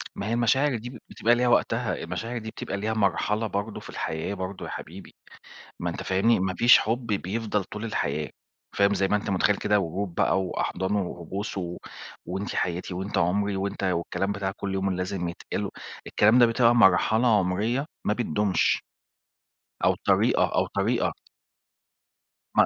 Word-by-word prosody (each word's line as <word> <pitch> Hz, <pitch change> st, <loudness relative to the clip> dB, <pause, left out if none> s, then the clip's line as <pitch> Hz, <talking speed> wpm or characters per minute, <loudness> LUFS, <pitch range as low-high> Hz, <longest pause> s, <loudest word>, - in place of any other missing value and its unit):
ما 100 Hz, -, -4 dB
هي 115 Hz, -, -1 dB
المشاعر 130 Hz, +4 st, +2 dB
دي 120 Hz, +3 st, -7 dB
ب 125 Hz, -, -10 dB
بتبقى 120 Hz, +2 st, +2 dB
ليها 125 Hz, +1 st, +1 dB
وقتها، 120 Hz, -, +2 dB
المشاعر 120 Hz, +2 st, -4 dB
دي 110 Hz, -1 st, -5 dB
بتبقى 100 Hz, -, -5 dB
ليها 110 Hz, +2 st, -1 dB
مرحلة 105 Hz, +1 st, +1 dB
برضه 100 Hz, +1 st, -3 dB
في -, -, -12 dB
الحياة 80 Hz, +5 st, -3 dB
برضه 95 Hz, 0 st, -5 dB
يا -, -, -7 dB
حبيبي، 90 Hz, +4 st, -9 dB, 0.6 s
ما -, -, -2 dB
أنت -, -, -5 dB
فاهمني، 100 Hz, +5 st, +2 dB
ما 95 Hz, 0 st, 0 dB
فيش 120 Hz, +4 st, +7 dB
حُب 115 Hz, +3 st, -1 dB
بيفضل 105 Hz, +1 st, -1 dB
طول 105 Hz, +4 st, -7 dB
الحياة، 75 Hz, -8 st, -2 dB, 0.5 s
فاهم، 100 Hz, 0 st, +4 dB
زي 95 Hz, -1 st, +1 dB
ما 105 Hz, -, +2 dB
أنت 105 Hz, 0 st, -2 dB
متخيّل 100 Hz, +1 st, +2 dB
كده 105 Hz, 0 st, +2 dB
ورود 90 Hz, 0 st, -3 dB
بقى 95 Hz, -, +2 dB
وأحضان 95 Hz, +1 st, -2 dB
وبوس 95 Hz, +1 st, -4 dB
و 90 Hz, -2 st, -4 dB, 0.5 s
وأنتِ 95 Hz, +3 st, -4 dB
حياتي 90 Hz, +1 st, -2 dB
وأنت 95 Hz, +3 st, -3 dB
عُمري 100 Hz, +4 st, +1 dB
وأنت 100 Hz, +1 st, -3 dB
والكلام 90 Hz, +1 st, -1 dB
بتاع 100 Hz, -1 st, -2 dB
كلّ 100 Hz, -1 st, -3 dB
يوم 95 Hz, 0 st, 0 dB
اللي 95 Hz, -, -2 dB
لازم 90 Hz, -1 st, -2 dB
يتقال، 85 Hz, -, -4 dB, 0.4 s
الكلام 110 Hz, +4 st, +4 dB
ده 120 Hz, -, +8 dB
بتبقى 115 Hz, 0 st, +4 dB
مرحلة 110 Hz, +3 st, +4 dB
عُمريّة 105 Hz, +9 st, 0 dB, 0.2 s
ما 105 Hz, -, +3 dB
بتدومش، 105 Hz, -5 st, +1 dB, 1.0 s
أو -, -, +4 dB
طريقة -, -, +4 dB
أو -, -, +2 dB
طريقة -, -, +1 dB, 1.5 s
م -, -, +7 dB
100 Hz, 165 wpm, -26 LUFS, 95-110 Hz, 1.5 s, ده